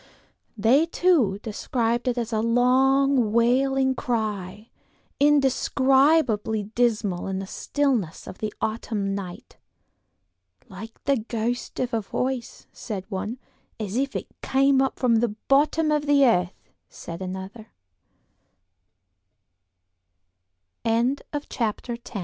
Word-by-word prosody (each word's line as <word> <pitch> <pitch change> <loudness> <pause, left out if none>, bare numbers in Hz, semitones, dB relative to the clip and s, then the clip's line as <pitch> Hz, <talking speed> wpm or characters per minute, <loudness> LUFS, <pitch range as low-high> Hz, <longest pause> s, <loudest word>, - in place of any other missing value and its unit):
They, 255 +10 +4
too, 325 - +2
described 235 +2 -1
it 250 -1 0
as 235 -1 -3
a 215 - +1
long, 255 +1 +3
wailing 265 +3 +2
cry, 215 -5 -3 0.5
indescribably 270 -4 +3
dismal 215 -4 0
in 190 -1 -2
the 195 - -4
stillness 245 - -1
of 185 - -10
the 215 -1 -3
autumn 215 -3 -2
night; 185 -3 -7 1.1
"like 215 +5 -11
the 275 -1 +2
ghost 230 +2 -3
of 250 -2 -2
a 225 - +1
voice," 250 +4 -4
said 195 -4 -6
one; 210 +4 -4 0.4
"as 210 -1 -4
if 275 +2 -1
it - - -3 0.2
came 270 0 +3
up 270 - -1
from 240 -3 +3
the 225 -2 0
bottom 305 +3 +3
of 300 -1 0
the 285 -1 +5
earth," 180 -7 0 0.2
said 170 +2 -9
another. 190 +4 -7
235 Hz, 105 wpm, -24 LUFS, 210-270 Hz, 1.1 s, the